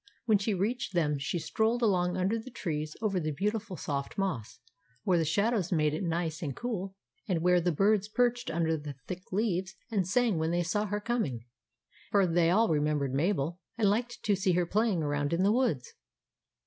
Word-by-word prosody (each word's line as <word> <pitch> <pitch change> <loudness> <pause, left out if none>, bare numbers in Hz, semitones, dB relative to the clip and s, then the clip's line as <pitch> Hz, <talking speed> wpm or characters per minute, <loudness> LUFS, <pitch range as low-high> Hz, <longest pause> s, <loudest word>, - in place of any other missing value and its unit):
When 215 -3 +4
she 205 +1 0
reached 205 +1 -2
them 150 -4 +1
she 135 +6 -2
strolled 220 +8 0
along 180 -4 +2
under 195 +5 +1
the 225 - -9
trees 155 -9 -4
over 195 -4 +1
the 155 -2 -2
beautiful 205 +5 -2
soft 140 -2 -4
moss, 180 - -2 0.5
where 180 -3 +3
the - - +2
shadows 200 +3 +1
made 150 -3 +2
it 155 - -2
nice 165 -1 -2
and 140 -6 -3
cool, 195 -6 -4 0.3
and 175 -5 0
where 180 0 +4
the 175 +1 +1
birds 205 +5 +2
perched 245 +2 +1
under 160 0 +1
the 145 -2 -7
thick 185 0 -7
leaves 190 -2 -1 0.2
and 195 -5 +1
sang 220 -2 +2
when 160 0 0
they 175 +1 +1
saw 205 +5 0
her 205 +1 -1
coming; 205 - -2 0.6
for 200 -2 +4
they 170 -1 +3
all 220 +6 +4
remembered 150 -3 +1
Mabel, 170 +2 0 0.2
and 210 -3 +3
liked 240 +3 -2
to 205 - +3
see 190 -1 +1
her 175 0 +2
playing 205 -2 +1
around 145 +1 -1
in 175 +3 +2
the 200 - +4
woods. 235 - 0
185 Hz, 195 wpm, -30 LUFS, 160-210 Hz, 0.6 s, When